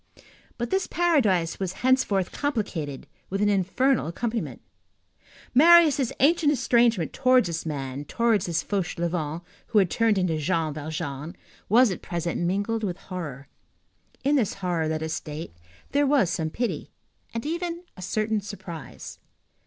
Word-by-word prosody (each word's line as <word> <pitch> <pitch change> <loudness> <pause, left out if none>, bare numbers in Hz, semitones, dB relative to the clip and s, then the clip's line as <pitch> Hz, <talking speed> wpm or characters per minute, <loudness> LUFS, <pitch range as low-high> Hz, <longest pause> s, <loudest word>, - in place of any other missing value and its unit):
But 240 - -3
this 385 0 +1
paradise 220 - +2
was 190 -2 -2
henceforth 210 -8 +2
complicated 190 - -3 0.2
with 195 - -2
an 205 0 +3
infernal 205 - +2
accompaniment. 225 +7 -3 0.9
Marius' 305 -2 +6
ancient 300 +1 +4
estrangement 235 - +2
towards 255 -3 +4
this 165 -1 -3
man, 140 -2 -4
towards 225 +1 +1
this 165 -2 0
Fauchelevent 170 -4 -2 0.2
who 220 - 0
had 190 -4 +4
turned 225 -3 +2
into 175 -4 +1
Jean 160 0 0
Valjean, 155 +1 -5 0.3
was 235 +2 +6
at 180 - -5
present 170 -1 -3
mingled 205 +6 -1
with 185 -3 -2
horror. 150 -9 -7 0.8
In 285 +2 +3
this 215 -6 0
horror, 175 -4 -1
let 155 0 -2
us 160 0 -2
state, 155 - -6 0.4
there 285 0 +3
was 265 - +3
some 160 -2 -1
pity, 240 +8 -3 0.4
and 230 +3 -4
even 340 +2 -3
a 185 - -11
certain 215 +3 -1
surprise. 185 -5 -9
195 Hz, 140 wpm, -26 LUFS, 165-245 Hz, 0.9 s, Marius